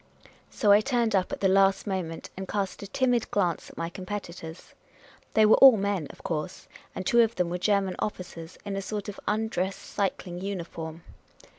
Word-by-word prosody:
" - - -29
So 210 -5 +2
I 205 +1 +7
turned 235 -3 +1
up 185 -1 +1
at - - -5
the 195 - +4
last 195 0 +4
moment, 185 -5 -4
and 190 0 -6
cast 195 -2 -2
a 200 - -6
timid 245 +2 +1
glance 180 -4 0
at - - -16
my 165 - -2
competitors. 175 -2 -7 0.6
They 220 - +6
were 215 - +6
all 265 -4 +9
men, 195 -6 -1
of - - -14
course, 160 +2 -4 0.3
and 185 - -4
two 235 +4 +5
of 230 0 +2
them 180 -2 0
were 180 - -2
German 195 -1 +1
officers 180 -4 -5
in 200 - -3
a 195 - -2
sort 205 +1 -4
of 200 - -8
undress 210 -3 0
cycling 185 -3 -3
uniform. 170 -4 -5
195 Hz, 190 wpm, -27 LUFS, 180-210 Hz, 0.6 s, all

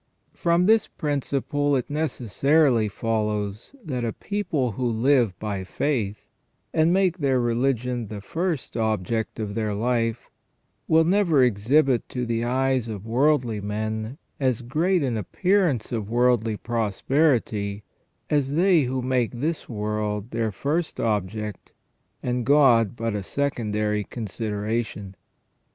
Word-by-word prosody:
From 170 0 +2
this 220 +1 +4
principle 145 0 -1
it 125 - -1
necessarily 140 -3 +2
follows 105 - -2
that 130 -6 -3
a 115 - -1
people 170 - -2
who 125 +4 -2
live 120 -3 +2
by 100 -2 -3
faith 105 -1 -2 0.5
and 160 +1 +3
make 185 -1 +2
their 135 -3 +2
religion 120 0 0
the 105 0 -6
first 160 - -3
object 110 0 -1
of 105 -2 -3
their 105 -1 -1
life, 115 +1 -1 0.6
will 160 0 +5
never 170 -5 +3
exhibit 125 +4 +2
to 125 -1 -3
the 115 0 -1
eyes 130 0 +1
of 105 -2 -6
worldly 120 -2 +1
men 110 +4 -3 0.2
as 130 -3 0
great 165 +7 +1
an 125 -4 -1
appearance 160 - +1
of 110 -4 -3
worldly 120 -2 +2
prosperity 115 -2 0 0.4
as 145 -1 0
they 175 -4 +4
who 130 0 -2
make 125 -2 +1
this 150 +7 -3
world 105 0 -3
their 115 -1 -1
first 155 - -2
object 105 -1 -2 0.5
and 125 0 -1
God 120 -5 +4
but 115 -1 -2
a 105 - -2
secondary 105 -4 -1
consideration. 105 -2 -4
120 Hz, 125 wpm, -24 LUFS, 110-145 Hz, 0.6 s, will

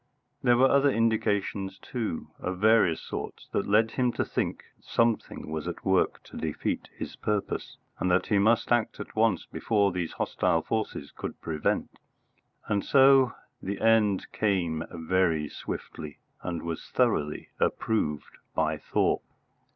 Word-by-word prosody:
There 120 -1 +4
were 130 +2 +6
other 140 +1 +4
indications 105 -4 0
too, 115 -10 -4
of 90 0 -3
various 105 -4 +4
sorts, - - -6
that 100 - -1
led 110 +2 +4
him 125 -2 +1
to - - -1
think - - -2 0.2
something 115 -8 0
was 80 -1 -3
at - - -6
work - - +2
to - - -11
defeat 80 -2 -2
his - - -6
purpose, 105 -2 -2 0.2
and 90 - +1
that 90 +1 +3
he 105 - +2
must 110 +4 +3
act 120 -2 +1
at - - -8
once 110 -5 +2
before 100 -3 +1
these 90 -2 -3
hostile 80 -1 0
forces 110 -10 -3
could - - -6
prevent. 75 -2 -2 0.7
And 100 -2 +1
so 135 -2 +5 0.3
the 100 +1 -4
end 110 -4 +3
came 90 -7 0
very 85 -2 +1
swiftly, 75 +1 -7 0.2
and 85 -2 -4
was 85 -1 -5
thoroughly 75 +1 0
approved 75 -10 -1 0.2
by - - +1
Thorpe. - - +1
100 Hz, 145 wpm, -28 LUFS, 85-115 Hz, 0.7 s, were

